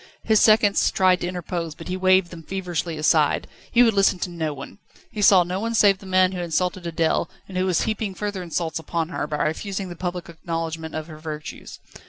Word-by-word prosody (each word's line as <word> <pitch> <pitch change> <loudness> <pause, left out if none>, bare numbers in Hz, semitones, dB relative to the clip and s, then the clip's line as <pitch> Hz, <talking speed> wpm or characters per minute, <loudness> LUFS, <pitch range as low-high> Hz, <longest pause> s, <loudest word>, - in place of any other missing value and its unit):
His 220 -1 +4
seconds 215 -2 +4
tried 185 -1 +3
to 175 - -1
interpose, 175 -3 -4
but - - -10
he 180 - -2
waved 185 -1 +3
them 170 -2 -9
feverishly 175 -2 -3
aside. 155 -1 +2 0.3
He 245 - +6
would 225 -2 +4
listen 195 -1 +3
to 180 - -2
no 160 -3 -2
one. 140 +7 -9 0.3
He 210 - -4
saw 195 -3 +7
no 180 +2 -3
one 230 +2 -2
save 200 -3 +5
the 195 - -12
man 185 0 +3
who 185 - -5
had 175 - -2
insulted 180 +2 -1
Adèle, 165 -1 0 0.2
and 190 - -10
who 185 +1 +1
was 180 -3 +2
heaping 215 -3 -2
further 205 -2 -3
insults 165 -1 -3
upon 165 +1 -3
her, 150 - -3
by 150 0 -1
refusing 190 +4 -3
this 175 - -9
public 180 -1 -4
acknowledgment 165 -1 -5
of 155 -1 -4
her 155 -2 -11
virtues. 155 -1 -7
180 Hz, 220 wpm, -23 LUFS, 165-190 Hz, 0.3 s, saw